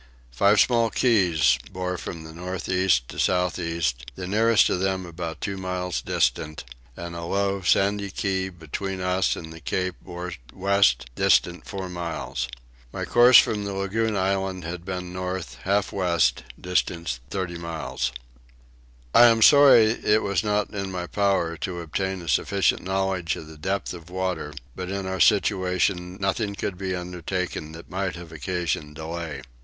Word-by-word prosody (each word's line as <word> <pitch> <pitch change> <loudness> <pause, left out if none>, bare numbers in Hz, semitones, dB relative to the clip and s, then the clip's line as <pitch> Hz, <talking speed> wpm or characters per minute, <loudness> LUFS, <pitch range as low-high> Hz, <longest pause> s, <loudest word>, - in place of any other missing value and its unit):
Five 100 - +4
small 115 -2 +4
keys 90 - +3
bore 90 0 -3
from 85 -1 -6
north 90 +2 -5
east 90 -10 +2
to - - -7
south 90 0 +1
east, 80 -8 -2
the 95 - -5
nearest 110 +4 +4
of - - 0
them 95 -1 -1
about 85 -2 -6
two 100 -1 -3
miles 90 -2 -3
distant, 75 0 0 0.3
and 85 0 -6
a 85 - -5
low 100 +2 0
sandy 100 +2 +2
key 95 -1 -1
between 95 +3 -5
us 90 +1 +1
and 80 -1 -8
the 80 - -10
cape 90 +5 -2
bore 90 -1 -6 0.2
west 95 -10 +3
distant 85 +7 +2
four 95 -2 -5
miles. 75 -8 -4 0.4
My - - -4
course 120 +1 +7
from 105 -2 +3
the 100 -1 -4
lagoon 105 +2 0
island 95 -1 -1
had 85 +1 -6
been 90 -1 -5
north 95 -1 -4
half 100 +1 +1
west 85 -9 +1
distant 85 -6 -1
30 90 -2 -3
miles. 80 -7 -3 1.0
I 120 - +9
am 115 -1 +4
sorry 140 -4 +8
it 110 -1 +2
was 100 +1 0
not 105 -1 0
in 100 -2 -4
my 90 -1 -3
power 95 -4 +1
to 85 +3 -4
obtain 95 +3 -3
a - - -10
sufficient 100 +9 +2
knowledge 95 -2 -1
of - - -8
the 80 0 -12
depth 95 +6 -2
of 85 -1 -11
water 90 -5 -2 0.2
but 90 -1 -5
in 100 0 -3
our 95 0 -3
situation 95 -3 +2
nothing 100 +1 -1
could 100 - -3
be 95 -1 -2
undertaken 90 -2 -4
that 80 +1 -11
might 95 -1 -2
have 85 -2 -10
occasioned 80 -2 -3
delay. 80 -3 -5
90 Hz, 160 wpm, -25 LUFS, 85-100 Hz, 1.0 s, I